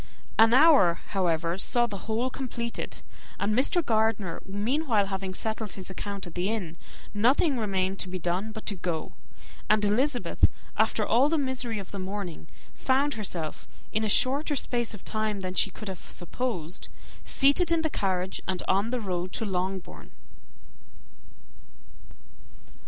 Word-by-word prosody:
An 225 0 +8
hour, 260 - +6
however, 175 -2 0
saw 240 +4 +3
the 205 -4 -7
whole 235 +4 0
completed; 240 -3 -4 0.4
and 205 +2 +1
Mr. 285 +6 +2
Gardiner, 220 -5 +1
meanwhile, 220 +3 +1
having 190 -1 -4
settled 220 -1 -2
his 190 -1 -7
account 200 +1 -5
at 175 - -9
the 180 +3 -1
inn, 190 -8 -3 0.4
nothing 260 +8 +3
remained 195 -2 0
to 185 - 0
be 185 - -3
done 180 +5 -1
but 220 0 -8
to 205 - -1
go; 170 -3 -3 0.6
and 215 0 +4
Elizabeth, 245 +5 +2 0.3
after - - +2
all 265 +5 +4
the 325 - +2
misery 260 -5 -1
of 195 -2 -7
the 200 - -5
morning, 185 -4 -5 0.3
found 275 +2 +1
herself, 175 -7 -4 0.2
in 220 +1 0
a 215 - 0
shorter 280 +7 +3
space 240 -4 0
of 200 - -14
time 215 -2 -1
than 185 -1 -3
she 200 - +3
could 215 +2 -9
have 190 -3 -7
supposed, 180 -4 -4 0.3
seated 285 +5 +3
in 330 -1 +3
the 315 - +1
carriage, 185 -1 -1
and 185 -1 -1
on 200 +4 +2
the 250 0 -1
road 185 -3 -3
to 225 - -1
Longbourn. 185 - -3
210 Hz, 150 wpm, -28 LUFS, 185-245 Hz, 0.6 s, An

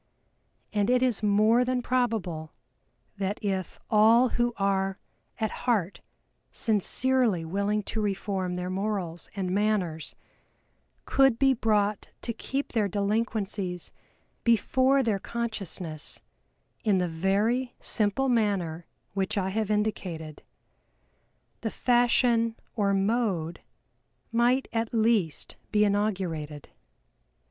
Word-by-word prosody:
And 205 0 +1
it 250 0 +3
is 245 -5 +1
more 215 +3 +4
than 250 0 -1
probable 215 -12 -1 0.6
that 200 +1 -2
if 190 -3 -2
all 225 +4 +5
who 240 +1 +1
are 195 -1 0 0.4
at 220 -2 0
heart 205 -7 -1 0.5
sincerely 225 -3 +1
willing 200 +4 0
to 220 - -3
reform 195 -3 -2
their 180 0 -3
morals 190 -4 -3
and 185 -2 -2
manners 190 -6 0 0.9
could 270 -4 +4
be 270 +1 +4
brought 210 -3 0
to 235 - -2
keep 275 +5 -4
their 215 -3 +1
delinquencies 200 -2 -1 0.5
before 260 +4 +3
their 215 -5 0
consciousness 195 -9 -4 0.6
in 210 -4 +3
the 180 -1 +1
very 205 +9 0
simple 215 +5 +1
manner 195 -9 0 0.3
which 195 +1 -1
I 190 -1 0
have 215 +1 -1
indicated, 185 -7 -2 1.2
the 225 - -2
fashion 240 -1 +2 0.2
or 205 -3 +2
mode 195 -5 0 0.7
might 240 +3 +2
at 225 0 -1
least 215 -9 +1
be 210 -1 +4
inaugurated. 185 -8 -2
210 Hz, 105 wpm, -27 LUFS, 190-230 Hz, 1.2 s, all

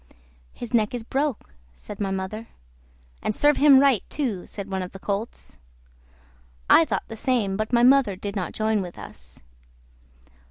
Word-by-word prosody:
"His 240 0 -9
neck 220 0 +2
is 240 - -5
broke," 270 - -3 0.2
said 195 - -11
my 200 -2 -1
mother. 195 +4 -4 0.7
"And 215 - -2
serve 295 0 +3
him 285 -2 +7
right, 275 -6 +3
too," 230 -12 -3
said 200 -1 -8
one 190 0 -2
of 180 - -7
the 195 - -9
colts. 200 - -5 1.1
I 165 - +6
thought - - -3
the 225 - -8
same, 225 -5 0
but 215 +3 -3
my 240 -1 +3
mother 255 -5 +5
did 200 +2 -6
not 185 -5 -3
join 215 -1 0
with 175 -2 -8
us. - - -12
215 Hz, 165 wpm, -24 LUFS, 195-245 Hz, 1.1 s, him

